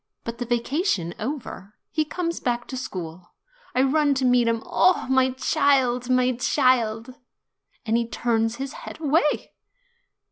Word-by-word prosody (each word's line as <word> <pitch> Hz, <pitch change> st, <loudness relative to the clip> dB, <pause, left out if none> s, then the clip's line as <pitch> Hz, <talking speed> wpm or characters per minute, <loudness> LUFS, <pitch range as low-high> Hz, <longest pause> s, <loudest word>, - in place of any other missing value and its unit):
But 230 Hz, +1 st, -6 dB
the 245 Hz, -, -2 dB
vacation 240 Hz, -, 0 dB
over, 215 Hz, -5 st, -6 dB, 0.2 s
he 310 Hz, -1 st, 0 dB
comes 335 Hz, +2 st, -3 dB
back 240 Hz, -1 st, -2 dB
to 260 Hz, -, -5 dB
school. 175 Hz, -8 st, -7 dB, 0.4 s
I 255 Hz, -, +4 dB
run 285 Hz, +1 st, +2 dB
to 260 Hz, -1 st, 0 dB
meet 245 Hz, -1 st, +4 dB
him; 230 Hz, -1 st, 0 dB
'Oh, 370 Hz, -, +3 dB
my 260 Hz, 0 st, +3 dB
child, 260 Hz, -3 st, +1 dB
my 255 Hz, 0 st, +3 dB
child 245 Hz, -3 st, +1 dB, 0.4 s
!' -, -, -44 dB
And 225 Hz, 0 st, +1 dB
he 235 Hz, 0 st, +1 dB
turns 225 Hz, -1 st, 0 dB
his 270 Hz, +2 st, -5 dB
head -, -, -9 dB
away." 300 Hz, 0 st, +1 dB
250 Hz, 150 wpm, -24 LUFS, 230-275 Hz, 0.4 s, I